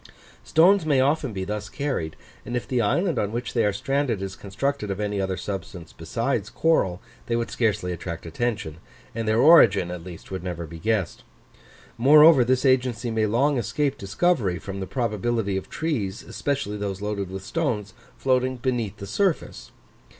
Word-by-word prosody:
Stones 185 +4 +4
may 145 -4 +2
often 140 -1 +1
be 95 -2 -4
thus 105 +1 -4
carried; 135 - -3 0.3
and 120 - -3
if 120 - -5
the 125 -2 +1
island 170 - +1
on 105 - -1
which 120 +1 -4
they 115 - +2
are 105 - +2
stranded 135 +2 -1
is 95 -1 -5
constructed 110 +3 -3
of 100 0 -3
any 105 -1 -1
other 95 -1 -2
substance 95 -3 -6
besides 110 +5 -2
coral, 115 - +1 0.3
they 115 - 0
would 115 0 -2
scarcely 105 -6 0
attract 85 -1 -6
attention, 85 -3 -3 0.4
and 115 -1 -3
their 110 +1 +2
origin 120 - +6
at 90 -2 -6
least 90 0 -11
would 95 -2 -4
never 85 -2 -4
be 80 +1 -10
guessed. 105 -3 -1 0.8
Moreover, 150 +2 +7
this 130 +2 +1
agency 125 -3 +2
may 110 -1 +1
long 130 +5 +2
escape 135 +6 -1
discovery 100 - 0
from 95 +1 -7
the 95 - -4
probability 115 -3 -1
of 95 - -4
trees, 115 -12 -2
especially 140 -7 -3
those 100 -1 -4
loaded 100 -2 -3
with 95 0 -7
stones, 115 -11 -2 0.2
floating 130 -1 +1
beneath 120 -5 -2
the 100 - -7
surface. 180 - -1
110 Hz, 170 wpm, -24 LUFS, 95-130 Hz, 0.8 s, Moreover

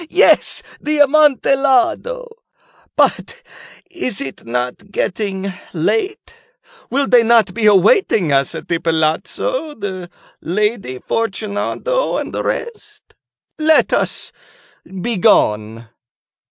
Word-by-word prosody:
he!—yes, 370 - +3 0.2
the 305 0 -2
Amontillado. 290 - +2 0.7
But 485 +1 0 0.4
is 340 - -4
it 135 -1 -7
not 125 +11 -4
getting 195 0 -3 0.2
late? 395 - -2 0.6
Will 275 +3 +1
not 235 -2 +5
they 185 - -12
be 215 +3 -2
awaiting 200 - +3
us 135 0 +1
at - - -8
the 170 - -1
palazzo, 165 - -1
the 190 -4 -6 0.3
Lady 205 - -2
Fortunato 225 - -2
and - - -5
the - - -2
rest? 425 -2 -6 0.5
Let 315 0 +3
us - - -1 0.7
be 235 -2 -1
gone." 110 - +2
225 Hz, 100 wpm, -17 LUFS, -, 0.7 s, not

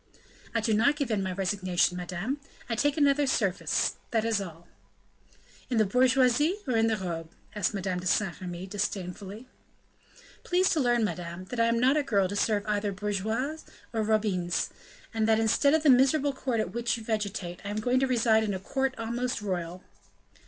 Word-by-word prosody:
"I 230 - +2
do 220 0 +1
not 235 +7 +3
give 280 -5 -2
in 210 -2 +1
my 190 -1 -2
resignation, 185 -1 0
madame; 180 +10 -3 0.3
I 240 - -2
take 290 +6 +1
another 285 -1 +3
service, 200 -8 0
that 225 -1 0
is 225 -3 +1
all." 170 -3 -9 1.0
"In 245 - 0
the 215 - +4
bourgeoisie 255 - +3
or 250 - 0
in 225 0 +3
the 220 -1 +1
robe?" 165 -4 -5 0.2
asked 210 0 -1
Madame 185 -2 -2
de 180 - -4
Saint 180 -3 0
Remy, 180 0 -5
disdainfully. 200 +2 -4 1.0
"Please 365 +1 +2
to 320 - +2
learn, 240 -3 +2
madame, 175 -3 -4
that 245 - -3
I 230 - +4
am 230 0 +2
not 265 +4 +4
a - - +3
girl 200 -8 +2
to 200 - -5
serve 205 0 +1
either 205 -1 0
bourgeoises 215 +9 -2 0.3
or 225 - 0
robines; 210 -5 0 0.4
and 220 -1 +1
that 220 0 +4
instead 230 +6 +3
of 315 - +1
the 305 - +5
miserable 275 +3 +4
court 255 -3 -2
at 200 -5 -1
which 235 0 0
you 225 - -9
vegetate, 205 -5 -3
I 200 - -5
am 205 - -3
going 245 +4 +1
to 265 - +2
reside 225 -3 +3
in 205 -3 -1
a - - -4
court 265 +6 -1
almost 235 +2 -2
royal." 180 -3 -4
220 Hz, 190 wpm, -28 LUFS, 190-250 Hz, 1.0 s, the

